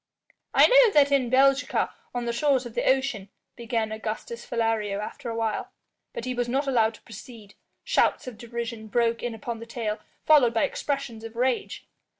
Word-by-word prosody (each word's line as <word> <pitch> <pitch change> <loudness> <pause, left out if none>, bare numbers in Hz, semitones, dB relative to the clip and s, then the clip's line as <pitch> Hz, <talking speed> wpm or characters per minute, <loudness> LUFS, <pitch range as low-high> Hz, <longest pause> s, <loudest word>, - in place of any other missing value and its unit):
"I - - +8
know - - +6
that 285 -1 +5
in 265 -4 +2
Belgica, 275 +2 +3 0.2
on 245 -1 -2
the 235 - -1
shores 265 0 +1
of 235 - -8
the - - +1
ocean 260 -7 0
" - - -56
began 225 -2 -1
Augustus 220 +2 -5
Philario 225 -4 -1
after 225 +3 -6
a 230 - -4
while. 225 -2 -2 0.4
But 235 - -6
he 255 - -2
was 245 -1 -2
not 270 +4 0
allowed 230 -5 +2
to - - -19
proceed. 220 -1 -12 0.3
Shouts - - +1
of 245 -4 -9
derision 235 -1 -6
broke 230 +1 +1
in 240 -2 -3
upon 230 +1 -6
the 230 - -9
tale, 225 -2 -3 0.3
followed 265 -7 +5
by 225 - +3
expressions 275 -6 -3
of 225 0 -9
rage. 250 +1 -1
235 Hz, 185 wpm, -26 LUFS, 225-260 Hz, 0.4 s, I